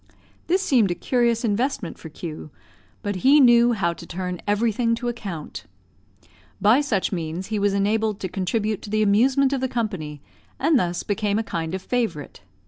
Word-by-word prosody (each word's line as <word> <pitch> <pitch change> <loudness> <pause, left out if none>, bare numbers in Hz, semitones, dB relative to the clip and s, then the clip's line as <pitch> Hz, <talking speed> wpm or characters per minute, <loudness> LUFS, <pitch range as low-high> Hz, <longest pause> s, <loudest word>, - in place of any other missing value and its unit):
This 370 +3 +2
seemed 245 - +3
a 175 - -1
curious 235 +3 +1
investment 220 -3 -1
for 160 - -9
Q, 155 0 -8 0.5
but 205 -2 -2
he 275 +10 +5
knew 240 -2 +6
how 170 -6 0
to 170 - -12
turn 180 0 -4
everything 230 +2 +1
to 240 +1 -3
account. 195 -10 -6 0.9
By 215 +8 +5
such 220 -10 -1
means 170 +1 -4
he 210 - +1
was 200 0 +1
enabled 215 +1 0
to 185 - -2
contribute 205 +3 -2
to - - -9
the 215 +1 +1
amusement 260 +7 +3
of 270 - -1
the 260 - -1
company, 190 -12 -3 0.4
and 300 -1 +3
thus 175 -3 -2
became 205 0 -1
a 225 - 0
kind 165 -4 -3
of 190 - -6
favourite. 225 - -3
210 Hz, 175 wpm, -23 LUFS, 185-240 Hz, 0.9 s, knew